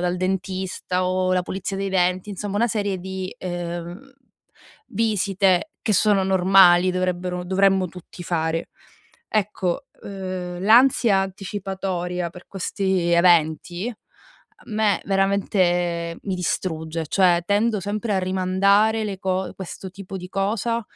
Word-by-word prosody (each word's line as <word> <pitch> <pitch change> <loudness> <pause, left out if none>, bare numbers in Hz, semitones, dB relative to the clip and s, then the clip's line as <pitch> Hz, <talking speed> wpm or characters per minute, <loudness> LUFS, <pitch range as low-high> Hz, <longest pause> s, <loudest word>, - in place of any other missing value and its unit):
dal 180 0 0
dentista 185 0 -2
o 185 0 +1
la 180 - +2
pulizia 195 +2 -4
dei 195 0 -2
denti, 185 0 +1
insomma 205 0 -4
una 230 +3 +3
serie 205 -3 -1
di, 190 0 -6
ehm, 175 +6 -6 0.8
visite 200 - +1
che 220 - 0
sono 205 -1 +3
normali, 185 -1 +5
dovrebbero 180 0 -2
dovremmo 190 0 +2
tutti 180 0 -11
fare. 165 -1 -1 0.6
Ecco, 210 +3 -1 0.2
ehm, 185 -2 -5
l'ansia 230 -1 +5
anticipatoria 190 -2 -3
per 180 +1 -14
questi 190 -2 -1
eventi 175 +5 +2 0.6
a - - -20
me 215 -1 +1
veramente 180 -4 +1
mi 195 - -2
distrugge, 165 -2 -2
cioè 175 -2 +3
tendo 210 +3 +1
sempre 205 +3 -2
a - - +2
rimandare 195 +4 +2
le 200 -3 -4
co 190 0 -2
questo 190 0 -8
tipo 195 +1 -8
di 180 -1 -8
cosa 215 +4 -1
190 Hz, 125 wpm, -23 LUFS, 180-200 Hz, 0.8 s, normali